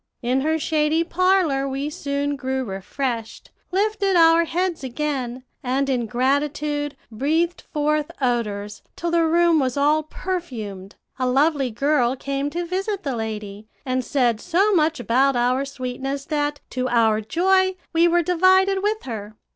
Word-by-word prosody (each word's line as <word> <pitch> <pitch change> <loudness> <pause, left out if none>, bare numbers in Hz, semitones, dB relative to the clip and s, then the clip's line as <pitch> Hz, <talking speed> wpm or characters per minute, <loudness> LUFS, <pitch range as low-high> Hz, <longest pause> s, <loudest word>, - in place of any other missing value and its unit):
In 255 +2 +1
her 315 +3 +1
shady 315 +1 +1
parlor 340 -6 +2
we 275 +2 -3
soon 285 0 -2
grew 265 -1 -2
refreshed, 225 +4 -4 0.2
lifted 400 0 +1
our 330 0 +6
heads 350 -1 -2
again, 260 -2 -3 0.2
and 265 +2 0
in 245 -3 0
gratitude 285 +4 -1
breathed 320 +9 0
forth 300 0 0
odors, 210 -5 -2
till 340 0 -3
the 335 0 +3
room 340 0 +4
was 260 -1 -1
all 295 +2 +3
perfumed. 245 - -6 0.2
A 255 - +1
lovely 275 0 +2
girl 255 +1 +1
came 275 +1 -3
to 345 +3 -3
visit 385 +3 -3
the 275 -4 -2
lady, 215 -2 -5 0.2
and 255 -1 -1
said 245 -6 +1
so 385 +4 +2
much 315 -4 +2
about 260 +3 +2
our 250 +3 +1
sweetness, 270 +1 -4
that, 295 -1 -2
to 255 0 -1
our 225 -2 +3
joy, 375 - +2 0.2
we 335 +1 +5
were 345 0 +3
divided 375 +3 +3
with 425 +2 -1
her. 215 -3 -6
285 Hz, 145 wpm, -22 LUFS, 250-335 Hz, 0.2 s, our